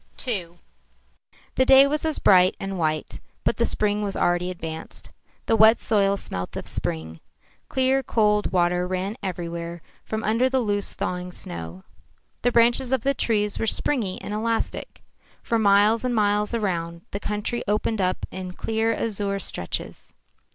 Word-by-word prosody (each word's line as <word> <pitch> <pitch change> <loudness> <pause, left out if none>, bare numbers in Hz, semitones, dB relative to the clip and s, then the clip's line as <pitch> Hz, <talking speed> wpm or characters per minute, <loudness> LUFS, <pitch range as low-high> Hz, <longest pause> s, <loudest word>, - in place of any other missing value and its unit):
II 175 -7 -1 1.0
The 260 - +2
day 270 0 +8
was 300 +3 -1
as 315 -1 0
bright 185 -1 +5
and 195 -1 -4
white, 155 -1 -2 0.2
but - - 0
the 235 - +2
spring 210 0 0
was 200 -2 -3
already 175 +1 +1
advanced. 160 -3 -7 0.3
The 225 - +2
wet 220 +1 +6
soil 200 -3 +2
smelt 90 - -4
of - - -6
spring. 80 0 -3 0.5
Clear 265 +1 +2
cold 210 -4 +1
water 180 0 +1
ran 185 +3 -2
everywhere 170 -3 -5 0.2
from 220 0 -4
under 230 +4 +2
the 265 0 +1
loose, 205 -4 -1
thawing 180 0 -3
snow. 85 - -7 0.6
The 245 - +2
branches 240 +2 +3
of 265 -3 +2
the 275 +4 +1
trees 210 -5 0
were 225 - -1
springy 220 -6 0
and 205 - -5
elastic. 225 +1 -3 0.4
For 230 - 0
miles 210 +2 +4
and 250 -1 0
miles 210 +1 +1
around, 170 -6 -2
the 200 - -3
country 210 +3 -3
opened 210 +1 0
up 185 0 -1
in 185 -1 -6
clear 225 +3 -1
azure 205 -3 -2
stretches. 90 - -6
205 Hz, 155 wpm, -24 LUFS, 180-230 Hz, 1.0 s, day